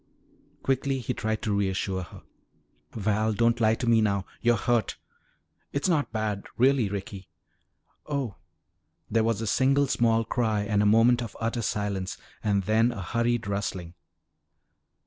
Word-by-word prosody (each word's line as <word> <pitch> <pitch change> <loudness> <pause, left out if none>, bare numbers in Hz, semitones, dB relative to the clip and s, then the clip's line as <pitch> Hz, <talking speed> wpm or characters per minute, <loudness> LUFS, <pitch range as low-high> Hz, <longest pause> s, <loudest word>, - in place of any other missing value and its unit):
Quickly 135 0 0
he 125 - -3
tried 110 0 -2
to 105 -2 0
reassure 95 -1 -1
her. 90 - -11 0.7
"Val, 110 +1 0
don't 115 +2 +2
lie 110 0 +4
to 120 - -4
me 115 -1 +4
now 100 -3 0 0.2
you're 120 0 +3
hurt!" 115 0 0 0.8
"It's 140 +5 0
not 150 -9 +1
bad, 110 -3 -2
really, 130 -3 +3
Ricky 95 -1 -6 0.4
" - - -50 0.2
"Oh!" 140 -8 -3 0.7
There 115 +1 +3
was 115 -1 0
a - - -2
single 135 +6 +3
small 115 -3 +2
cry 110 -3 0
and 105 -1 +1
a 105 - +3
moment 115 +3 +5
of 115 - -7
utter 115 +1 -1
silence 100 -3 -2 0.3
and 100 -2 +1
then 110 +4 +3
a 100 -5 -6
hurried 115 +4 0
rustling. 100 -4 -3
110 Hz, 150 wpm, -27 LUFS, 100-120 Hz, 0.8 s, moment